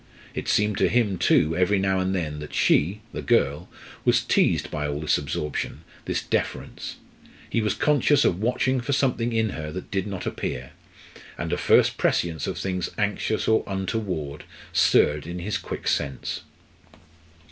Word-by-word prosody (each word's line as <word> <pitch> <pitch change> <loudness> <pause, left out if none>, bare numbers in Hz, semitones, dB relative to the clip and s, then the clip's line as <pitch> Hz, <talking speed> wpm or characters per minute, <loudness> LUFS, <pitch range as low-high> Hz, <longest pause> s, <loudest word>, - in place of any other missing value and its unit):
It - - -4
seemed 105 -1 +2
to - - +4
him 105 -7 +1
too, 80 +2 +3
every 90 +3 +3
now 95 0 +1
and 95 +1 0
then, 75 -4 -2
that 75 - -7
she 95 +8 +3
the - - -4
girl 75 - +1 0.3
was - - +3
teased - - +2
by 75 -1 -2
all 75 0 -2
this 75 - +2
absorption, 75 +1 -4 0.2
this - - -1
deference. - - -3 0.5
He 115 - 0
was 105 -2 0
conscious 145 0 +3
of 90 +3 +1
watching 125 +2 +1
for 140 +4 -1
something 125 -4 +1
in 110 -1 +1
her 75 -4 -5
that 90 +2 -7
did 95 -1 -1
not 95 -3 -5
appear; 60 0 -4 0.7
and - - -3
a - - +1
first - - +4
prescience 80 -4 +1
of - - -3
things 90 -2 -2
anxious 105 +1 0
or 110 0 +3
untoward 95 -7 -3 0.3
stirred 75 +1 +3
in 85 +1 -5
his 95 +5 -2
quick - - -6
sense. 70 -3 -1
95 Hz, 165 wpm, -25 LUFS, 75-110 Hz, 0.7 s, to